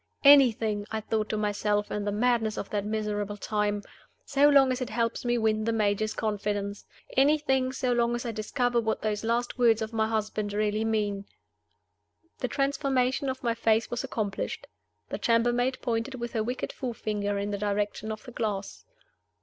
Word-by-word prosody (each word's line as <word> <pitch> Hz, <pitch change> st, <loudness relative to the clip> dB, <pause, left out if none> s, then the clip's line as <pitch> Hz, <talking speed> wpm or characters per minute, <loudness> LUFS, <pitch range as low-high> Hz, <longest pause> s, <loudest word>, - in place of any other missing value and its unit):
"Anything" 225 Hz, -7 st, +5 dB
(I 220 Hz, -, -2 dB
thought 215 Hz, 0 st, -2 dB
to 215 Hz, -, -1 dB
myself, 210 Hz, 0 st, 0 dB
in 205 Hz, -1 st, -2 dB
the 205 Hz, -, 0 dB
madness 225 Hz, 0 st, +1 dB
of -, -, -5 dB
that 205 Hz, -1 st, -1 dB
miserable 210 Hz, -1 st, -2 dB
time) 205 Hz, 0 st, -1 dB, 0.4 s
"so 285 Hz, +1 st, +4 dB
long 275 Hz, -2 st, +6 dB
as 255 Hz, 0 st, -2 dB
it 255 Hz, -, -2 dB
helps 230 Hz, +1 st, -1 dB
me 240 Hz, -1 st, +1 dB
to 235 Hz, -, 0 dB
win 215 Hz, 0 st, +1 dB
the 230 Hz, -, +1 dB
Major's 215 Hz, -1 st, 0 dB
confidence! 205 Hz, -1 st, -2 dB, 0.3 s
Anything, 270 Hz, -2 st, +3 dB
so 255 Hz, -1 st, 0 dB
long 240 Hz, 0 st, +2 dB
as 240 Hz, -, -4 dB
I 235 Hz, -, -1 dB
discover 240 Hz, +2 st, 0 dB
what 220 Hz, -1 st, -2 dB
those 210 Hz, -1 st, -1 dB
last 240 Hz, +2 st, -1 dB
words 230 Hz, -2 st, +5 dB
of 220 Hz, 0 st, -4 dB
my 220 Hz, -1 st, +1 dB
husband's 215 Hz, -2 st, -2 dB
really 210 Hz, +1 st, +1 dB
mean!" 205 Hz, -3 st, -1 dB, 1.1 s
The 250 Hz, -, -1 dB
transformation 275 Hz, 0 st, 0 dB
of 260 Hz, 0 st, -5 dB
my 235 Hz, -1 st, +1 dB
face 225 Hz, -1 st, +1 dB
was 240 Hz, +1 st, -2 dB
accomplished. 215 Hz, -6 st, -3 dB, 0.4 s
The -, -, -4 dB
chambermaid 240 Hz, +2 st, +2 dB
pointed 235 Hz, +3 st, -1 dB
with 240 Hz, -1 st, -5 dB
her 225 Hz, -, 0 dB
wicked 245 Hz, +3 st, -3 dB
forefinger 210 Hz, -5 st, -2 dB
in 200 Hz, +1 st, -2 dB
the 200 Hz, -, -3 dB
direction 205 Hz, +1 st, -1 dB
of 215 Hz, 0 st, -6 dB
the 250 Hz, -, -10 dB
glass. 210 Hz, -4 st, -4 dB
220 Hz, 180 wpm, -28 LUFS, 210-245 Hz, 1.1 s, long